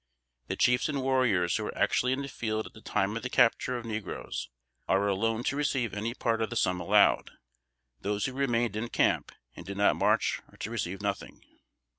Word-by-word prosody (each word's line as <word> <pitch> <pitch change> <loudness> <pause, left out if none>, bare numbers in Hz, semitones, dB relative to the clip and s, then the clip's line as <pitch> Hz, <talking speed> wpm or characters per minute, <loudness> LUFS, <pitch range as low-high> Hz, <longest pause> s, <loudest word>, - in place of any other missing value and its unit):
The - - -2
chiefs 125 +4 +3
and 140 -3 -2
warriors 120 -10 +2
who - - -3
were - - -6
actually 125 - +2
in 135 +2 -1
the - - -5
field 110 -4 -3
at - - -11
the 110 - -14
time 105 0 0
of 115 - -3
the 125 - -4
capture 125 0 +3
of 120 - -7
negroes 110 -3 -5 0.4
are 100 +1 +2
alone 110 +4 0
to 140 - 0
receive 135 -5 0
any 110 +3 -3
part 115 -1 0
of 110 - 0
the 120 - -5
sum 90 -5 +1
allowed. - - +4 0.7
Those 105 +1 -1
who 130 - -3
remained 120 -5 0
in 115 +2 -3
camp - - +1 0.2
and - - -9
did 100 0 -7
not 100 - +4
march - - +2
are - - -19
to 110 - -5
receive 100 -3 -3
nothing. 100 -1 -4
115 Hz, 205 wpm, -29 LUFS, 100-125 Hz, 0.7 s, allowed